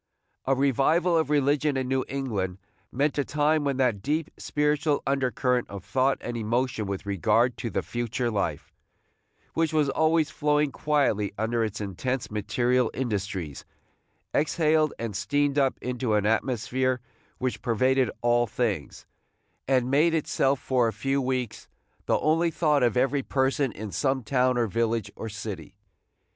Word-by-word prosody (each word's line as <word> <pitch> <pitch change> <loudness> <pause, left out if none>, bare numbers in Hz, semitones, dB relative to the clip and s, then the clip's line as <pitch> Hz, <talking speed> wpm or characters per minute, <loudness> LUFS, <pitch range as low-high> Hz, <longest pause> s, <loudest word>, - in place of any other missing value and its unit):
A 135 - +2
revival 140 +6 +2
of 160 -3 +1
religion 145 0 +2
in 130 -1 -1
New 130 0 +1
England 105 -9 -3 0.3
meant 145 +3 0
a - - +3
time 150 +2 +1
when 140 -2 -1
that 120 -7 +1
deep 150 +7 -1
spiritual 150 0 0
undercurrent 130 -2 0
of 100 -1 -8
thought 130 +1 +1
and 120 - -5
emotion 115 0 -1
with 100 +1 -4
regard 110 +5 +2
to 115 +2 -3
the - - -2
future 120 0 -2
life, 85 -8 -3 0.8
which 165 -1 +1
was 155 -3 +2
always 160 0 +2
flowing 150 -1 +1
quietly 135 -10 0
under 115 +2 0
its 110 -1 -3
intense 110 +6 -3
material 120 +4 +1
industries, 100 - -3 0.7
exhaled 155 0 +2
and 115 -4 -4
steamed 145 +7 +1
up 135 -1 +2
into 125 -3 -1
an 105 -1 +1
atmosphere 125 +3 0 0.4
which 130 0 -2
pervaded 130 +2 +2
all 120 0 +3
things, 105 -9 -3 0.6
and 130 -1 +2
made 160 +4 +4
itself 140 -3 +1
for 125 -2 +1
a 110 - -2
few 135 +6 -1
weeks 130 -2 -3 0.4
the - - +3
only 165 +2 +2
thought 150 -3 +2
of 125 0 +2
every 135 +2 +2
person 135 0 0
in 105 0 -7
some 130 +1 0
town 125 +2 +2
or 120 - +2
village 115 0 -1
or 110 - -6
city. 105 -5 -7
130 Hz, 150 wpm, -26 LUFS, 110-140 Hz, 0.8 s, made